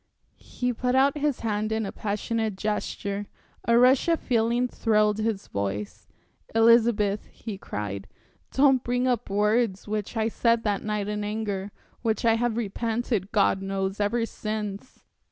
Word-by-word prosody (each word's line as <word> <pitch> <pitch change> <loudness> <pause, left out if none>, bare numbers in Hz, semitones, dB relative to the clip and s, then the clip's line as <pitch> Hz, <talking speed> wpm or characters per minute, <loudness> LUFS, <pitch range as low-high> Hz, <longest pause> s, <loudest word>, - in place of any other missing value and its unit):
He 245 0 -3
put 250 +2 0
out 275 +2 +4
his 295 -2 -1
hand 215 -1 -1
in 220 0 0
a 195 - -4
passionate 215 +1 -2
gesture, 205 0 -3 0.4
a 235 0 +5
rush 255 +4 +5
of 330 -1 +3
feeling 235 +1 +1
thrilled 215 -3 +2
his 215 -2 -1
voice. 100 +1 -4 0.5
"Elizabeth," 225 -3 +4
he 220 -3 -7
cried, 100 - -5 0.4
"don't 265 -2 +4
bring 245 +1 0
up 245 -2 0
words 210 0 +1
which 210 +2 -3
I 220 0 +2
said 230 0 +2
that 205 -2 0
night 210 -1 -2
in 210 0 -2
anger, 205 -2 -3 0.3
which 225 -1 0
I 225 - +5
have 230 0 0
repented 225 -1 -2
God 200 -2 +3
knows! 195 0 -2
ever 230 +3 +1
since. 215 0 -5
220 Hz, 150 wpm, -26 LUFS, 205-235 Hz, 0.5 s, a